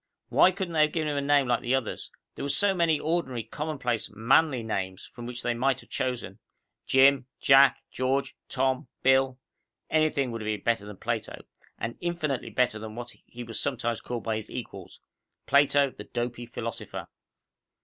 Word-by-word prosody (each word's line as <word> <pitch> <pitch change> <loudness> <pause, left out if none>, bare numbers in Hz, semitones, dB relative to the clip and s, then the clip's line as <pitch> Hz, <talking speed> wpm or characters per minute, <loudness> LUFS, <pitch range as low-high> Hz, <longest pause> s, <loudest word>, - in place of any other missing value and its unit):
Why - - +6
couldn't 185 -2 -4
they 155 - +3
have 150 0 +3
given 155 -2 0
him 145 - -1
a - - +1
name 140 -1 +3
like 120 -1 +1
the 125 +2 +1
others? 130 -4 -3 0.2
There - - -8
were 140 - -2
so 200 +7 +4
many 165 -4 +2
ordinary, 150 -8 -1
commonplace, 125 -2 -3
manly 125 +5 +3
names 95 -4 -3
from 120 0 -9
which 125 0 -6
they 120 - +1
might 130 +2 +1
have - - -20
chosen. 125 -2 -3 0.5
Jim, 135 -1 +5
Jack, 135 -1 +6
George, 130 +2 -1
Tom, 130 -1 0 0.2
Bill 130 0 +4 0.5
anything 155 -5 +2
would 115 -1 -5
have 110 - -5
been 105 -1 -1
better 115 -3 0
than 105 -2 -9
Plato. - - -4 0.3
And 115 +1 -5
infinitely 170 -6 -2
better 120 -4 +1
than 110 0 -7
what 120 0 -6 0.2
he 120 0 -8
was 115 -1 -5
sometimes 120 -3 -1
called 120 -2 -5
by 110 -1 -1
his 110 - -7
equals - - -8 0.5
"Plato, 140 -1 +4
the - - -10
dopy 120 0 -4
philosopher." 115 -1 -5
130 Hz, 180 wpm, -27 LUFS, 120-145 Hz, 0.5 s, Why